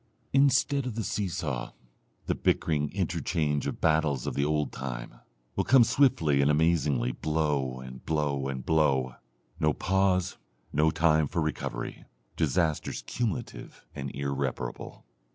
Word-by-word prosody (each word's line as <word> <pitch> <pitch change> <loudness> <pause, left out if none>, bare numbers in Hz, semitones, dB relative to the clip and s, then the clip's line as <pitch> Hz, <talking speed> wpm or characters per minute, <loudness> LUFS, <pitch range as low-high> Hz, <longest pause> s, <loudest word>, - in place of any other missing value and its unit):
Instead 140 0 +3
of 120 - -4
the 115 - -2
seesaw, 85 -12 -3 0.5
the - - +1
bickering 75 -2 0
interchange 75 -5 -1
of - - -4
battles 80 -5 +2
of - - -2
the 70 - 0
old 75 -2 0
time, - - -6 0.4
will - - +1
come 130 -2 +6
swiftly 80 - +3
and 70 - +3
amazingly 75 -5 +2
blow, 75 -3 -1
and 65 -1 -10
blow, 75 -3 -1
and 65 -2 -5
blow, 70 -5 +2 0.5
no 75 0 +3
pause, 95 0 +1 0.3
no 75 +2 +4
time 80 -1 +3
for 85 - -2
recovery, 75 -6 -3 0.3
disasters 80 -4 0
cumulative 115 -8 -4
and 70 -2 -5
irreparable. 70 -3 -4
75 Hz, 130 wpm, -28 LUFS, 70-85 Hz, 0.5 s, come